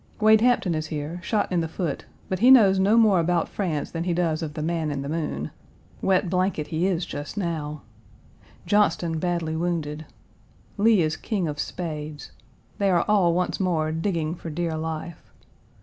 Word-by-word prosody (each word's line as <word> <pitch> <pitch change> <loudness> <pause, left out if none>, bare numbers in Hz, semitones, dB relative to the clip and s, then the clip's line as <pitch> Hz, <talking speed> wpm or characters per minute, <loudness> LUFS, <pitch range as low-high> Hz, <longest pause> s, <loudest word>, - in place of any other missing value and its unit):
Wade 220 0 +5
Hampton 240 -7 +3
is 155 0 -2
here, 155 +2 -4
shot 210 0 -1
in 175 -2 +2
the 165 - -2
foot, 160 -2 -4 0.2
but 185 - -2
he 245 +5 +5
knows 205 -7 +7
no 200 +4 +4
more 215 -5 +5
about 170 0 +1
France 165 -8 -3
than 165 0 -3
he 175 -2 0
does 165 -2 0
of 150 -2 -5
the 155 - -3
man 165 -1 -1
in 140 -2 -3
the - - -5
moon. 150 - -3 0.5
Wet 190 0 +2
blanket 185 -3 0
he 165 +3 0
is 180 -3 0
just 145 +7 -7
now. 155 -5 -3 0.8
Johnston 170 -5 +2
badly 170 -2 -1
wounded. 160 -3 -2 0.7
Lee 215 -4 +5
is 155 0 0
King 200 -7 -2
of 145 -1 -4
Spades. 150 -4 -5 0.5
They 200 -1 +2
are 175 -2 +2
all 190 -5 +3
once 180 0 -1
more 165 -5 0
digging 165 -1 -1
for 170 -1 -7
dear 165 +1 -2
life. 160 +1 -5
170 Hz, 180 wpm, -25 LUFS, 155-190 Hz, 0.8 s, knows